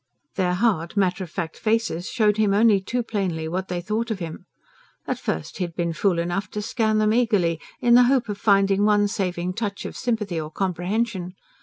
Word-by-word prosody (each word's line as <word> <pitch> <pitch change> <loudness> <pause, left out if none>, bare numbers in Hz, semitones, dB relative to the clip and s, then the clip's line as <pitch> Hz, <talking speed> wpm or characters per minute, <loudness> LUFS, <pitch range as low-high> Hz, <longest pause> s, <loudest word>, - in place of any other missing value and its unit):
Their 180 -2 0
hard, 190 -4 0
matter 190 -1 +1
of 175 - -8
fact 165 0 -5
faces 220 -6 0
showed 215 -4 +2
him 210 -2 +3
only 210 -2 +5
too 245 +5 -2
plainly 185 -8 -2
what 185 +3 -3
they 175 -1 -3
thought 215 +5 -2
of 220 - -1
him. 165 -4 -7 0.6
At - - -2
first 80 - -4
he - - +1
had 170 -2 -5
been 170 -1 -1
fool 185 +1 +1
enough 175 +3 -2
to - - 0
scan 220 -1 +1
them 215 0 +3
eagerly, 205 -9 +2 0.2
in 240 - +4
the 245 +1 +7
hope 260 -4 +2
of 205 -1 -4
finding 200 -1 +3
one 205 -1 +4
saving 180 -3 -2
touch 205 -1 -4
of - - -6
sympathy 210 -8 -2
or 155 - -6
comprehension. 185 +2 -2
195 Hz, 200 wpm, -23 LUFS, 175-220 Hz, 0.6 s, the